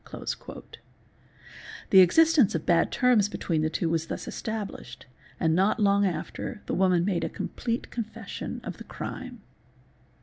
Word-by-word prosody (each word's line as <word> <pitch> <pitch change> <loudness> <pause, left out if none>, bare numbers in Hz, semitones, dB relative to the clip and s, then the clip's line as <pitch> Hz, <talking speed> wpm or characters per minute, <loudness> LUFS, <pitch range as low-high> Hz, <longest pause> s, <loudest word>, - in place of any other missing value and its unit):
'The 190 - +8
existence 300 - +5
of 160 - -3
bad 170 -2 +3
terms 240 -5 +3
between 165 -6 -1
the 155 - +1
two 165 - -1
was 165 0 -1
thus - - -5
established 210 - -6 0.3
and 160 -1 +2
not 195 +7 +2
long 200 -1 +3
after 175 +4 -5
the - - -3
woman 180 -2 +3
made 190 -4 0
a - - -1
com - - -5
plete 235 0 -3
confession 225 -2 -6
of - - -6
the - - -9
crime. 255 -4 -7
195 Hz, 145 wpm, -27 LUFS, 170-225 Hz, 0.3 s, The